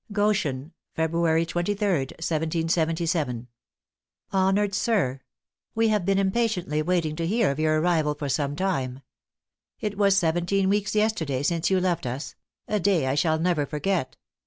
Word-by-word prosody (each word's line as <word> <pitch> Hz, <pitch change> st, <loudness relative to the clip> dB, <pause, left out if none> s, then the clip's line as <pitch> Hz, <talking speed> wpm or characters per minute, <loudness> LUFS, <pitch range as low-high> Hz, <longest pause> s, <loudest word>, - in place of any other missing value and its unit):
"Goshen, 195 Hz, -9 st, 0 dB, 0.2 s
February 165 Hz, 0 st, +1 dB
23d, 175 Hz, -4 st, -1 dB
1777. 160 Hz, -4 st, -1 dB, 0.9 s
"Honored 195 Hz, +1 st, +2 dB
Sir 185 Hz, -, 0 dB, 0.5 s
"We 225 Hz, 0 st, +3 dB
have 210 Hz, -4 st, +1 dB
been 195 Hz, 0 st, +2 dB
impatiently 190 Hz, -6 st, 0 dB
waiting 165 Hz, -2 st, 0 dB
to 165 Hz, -1 st, -1 dB
hear 215 Hz, -4 st, +2 dB
of 140 Hz, -, -5 dB
your 155 Hz, 0 st, +2 dB
arrival 155 Hz, -3 st, +1 dB
for 145 Hz, -1 st, -4 dB
some 140 Hz, +1 st, -1 dB
time. 135 Hz, -9 st, -2 dB, 0.8 s
It 210 Hz, -1 st, -4 dB
was 200 Hz, -1 st, +4 dB
seventeen 175 Hz, +2 st, +1 dB
weeks 205 Hz, +1 st, 0 dB
yesterday 165 Hz, -11 st, 0 dB
since 165 Hz, +2 st, +1 dB
you 190 Hz, -1 st, +3 dB
left 175 Hz, -6 st, -1 dB
us 130 Hz, +4 st, -5 dB, 0.3 s
a 210 Hz, -, 0 dB
day 185 Hz, -6 st, +2 dB
I 130 Hz, -, +1 dB
shall 160 Hz, +2 st, +2 dB
never 160 Hz, -3 st, 0 dB
forget. 165 Hz, 0 st, -2 dB
170 Hz, 140 wpm, -25 LUFS, 155-195 Hz, 0.9 s, was